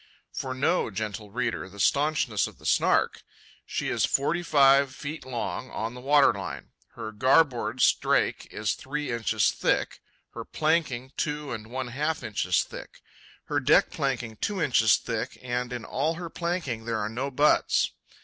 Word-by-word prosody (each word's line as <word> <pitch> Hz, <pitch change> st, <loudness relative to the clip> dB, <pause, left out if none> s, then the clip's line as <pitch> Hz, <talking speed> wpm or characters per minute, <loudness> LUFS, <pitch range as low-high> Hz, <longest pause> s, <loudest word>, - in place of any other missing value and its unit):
For 130 Hz, -1 st, -4 dB
know, 140 Hz, +4 st, +1 dB
gentle 105 Hz, 0 st, -5 dB
reader, 115 Hz, -3 st, -2 dB
the 100 Hz, +2 st, -13 dB
staunchness 140 Hz, -, +2 dB
of -, -, -13 dB
the -, -, -17 dB
Snark. -, -, +2 dB, 0.5 s
She -, -, -2 dB
is -, -, 0 dB
forty 155 Hz, +5 st, +1 dB
five 140 Hz, -4 st, +4 dB
feet 150 Hz, -1 st, -7 dB
long 130 Hz, +1 st, -4 dB
on 110 Hz, +2 st, -4 dB
the 125 Hz, -, -9 dB
waterline. 135 Hz, -, +2 dB, 0.2 s
Her 110 Hz, -, -6 dB
garboard 130 Hz, +3 st, +2 dB
strake -, -, +2 dB
is 105 Hz, -1 st, -1 dB
three 145 Hz, 0 st, -4 dB
inches 110 Hz, -3 st, +1 dB
thick; -, -, -1 dB, 0.3 s
her -, -, -6 dB
planking 155 Hz, -5 st, 0 dB
two 150 Hz, -2 st, -2 dB
and 110 Hz, -2 st, -6 dB
one 130 Hz, +1 st, -4 dB
half 150 Hz, +4 st, -2 dB
inches 100 Hz, -5 st, +1 dB
thick; -, -, -11 dB, 0.4 s
her -, -, -1 dB
deck -, -, +4 dB
planking 120 Hz, -5 st, -2 dB
two 205 Hz, -, -2 dB
inches 120 Hz, -8 st, +4 dB
thick -, -, -4 dB
and 125 Hz, 0 st, -3 dB
in 120 Hz, -2 st, -5 dB
all 155 Hz, +5 st, -1 dB
her 170 Hz, -1 st, -7 dB
planking 170 Hz, -10 st, -3 dB
there 115 Hz, -1 st, -1 dB
are 105 Hz, -1 st, -1 dB
no 125 Hz, +6 st, -3 dB
butts. 145 Hz, +3 st, +3 dB
130 Hz, 160 wpm, -27 LUFS, 115-150 Hz, 0.5 s, five